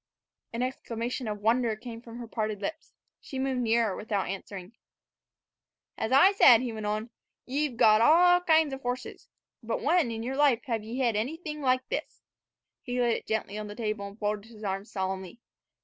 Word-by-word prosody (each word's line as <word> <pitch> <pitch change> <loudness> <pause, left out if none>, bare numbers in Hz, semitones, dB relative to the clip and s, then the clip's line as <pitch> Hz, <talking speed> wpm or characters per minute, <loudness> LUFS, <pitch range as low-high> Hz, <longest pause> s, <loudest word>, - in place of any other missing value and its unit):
An 235 +2 -2
exclamation 245 -1 -4
of 210 -1 -4
wonder 230 +1 +2
came 230 +1 -9
from 235 -1 -11
her 240 -1 -7
parted 215 -2 -3
lips. 310 +10 -6 0.2
She 265 - -8
moved 260 -1 -1
nearer 225 -3 +2
without 210 -3 -2
answering. 195 +1 -7 1.2
"As 220 - -3
I 280 +9 +7
said," 250 - +7
he 245 -3 -3
went 215 -1 -4
on, 215 +2 -2 0.3
"y' 285 +4 0
've 245 -5 -11
got 215 0 +6
all 355 +6 +6
kinds 320 -4 +3
of 270 - -6
horses; 245 0 -5 0.3
but 230 -1 -2
when 320 -4 +3
in 225 0 -4
yer 260 +3 -3
life 275 -5 +3
hev 230 -5 -2
ye 225 +3 -6
hed 240 -4 +1
anything 300 +7 -3
like 255 -1 +1
this?" - - -5 0.6
He 250 -1 -3
laid 240 -2 +2
it - - -12
gently 215 -1 -2
on 210 - -5
the 205 - -8
table, 215 -3 -3
and 200 +1 -12
folded 210 0 -3
his 220 -2 -13
arms 195 +1 -4
solemnly. 190 +1 -4
230 Hz, 190 wpm, -28 LUFS, 215-260 Hz, 1.2 s, I